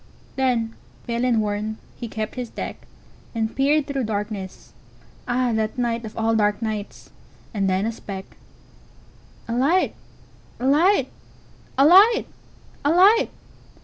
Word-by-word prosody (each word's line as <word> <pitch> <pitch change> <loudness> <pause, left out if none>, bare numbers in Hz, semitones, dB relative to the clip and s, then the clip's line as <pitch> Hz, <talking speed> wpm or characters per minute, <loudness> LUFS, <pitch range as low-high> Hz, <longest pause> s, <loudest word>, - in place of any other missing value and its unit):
Then, 240 -4 0 0.3
pale 235 0 -2
and 240 -3 +3
worn, 210 +1 -2 0.2
he 235 - -6
kept 220 -1 -4
his 250 -2 -5
deck, - - -7 0.5
And 220 -1 -1
peered 290 +2 +3
through 275 -3 -2
darkness. 205 -2 -5 0.5
Ah, 250 0 +1
that 220 +3 -1
nightOf 230 -3 -2
all 225 0 +1
dark 210 -1 +2
nights! 215 -2 -5 0.4
And 195 -3 0
then 190 +2 +1
a 225 - 0
speck—A 195 -4 -8 1.2
light! 300 +9 +2 0.7
A 250 - -3
light! 330 +9 +4 0.7
A 275 - +6
light! 400 +8 +7 0.6
A 290 - +2
light! 390 +8 +5
230 Hz, 125 wpm, -23 LUFS, 215-275 Hz, 1.2 s, light